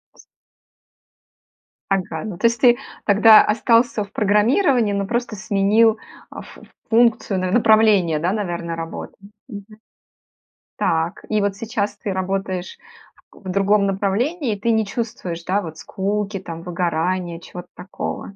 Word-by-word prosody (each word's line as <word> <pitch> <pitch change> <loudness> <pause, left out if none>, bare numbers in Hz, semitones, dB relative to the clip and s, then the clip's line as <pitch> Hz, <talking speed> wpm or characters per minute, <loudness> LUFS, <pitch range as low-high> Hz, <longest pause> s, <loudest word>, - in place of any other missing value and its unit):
Ас - - -18 1.7
Ага, 180 -5 -2
ну, 205 -5 -6
то - - -2
есть 230 -1 +2
ты 240 -2 +6 0.3
тогда 215 +1 +7
остался 230 +1 +2
в 200 - -14
программировании, 220 - +2
но 200 -1 -2
просто 240 0 -2
сменил, 210 +3 +2 0.3
а, - - -9
фу - - -15 0.3
функцию, 225 -4 +2
на 185 0 -2
направление, 215 -7 +4
да, 170 +4 0
наверно, 175 -5 -3
работы. 165 0 -7 0.3
Мгм. 205 -5 -9 1.1
Так. 165 +1 -1
И 215 -1 +1
вот 200 -1 -1
сейчас 215 -2 -3
ты 200 - -4
работаешь 190 -1 -3
в - - -45 0.5
к - - -21
в - - -3
другом 200 +2 +2
направлении, 220 - -1
и 205 - -7
ты 230 +3 0
не 220 -1 +1
чувствуешь, 200 -6 -5
да, 200 +3 0
вот 160 -4 -8
скуки 200 +3 -3
там, 165 -3 -8
выгорания, 175 0 -2
чего-то 180 +1 -11
такого? 190 +1 -7
200 Hz, 145 wpm, -20 LUFS, 185-220 Hz, 1.7 s, тогда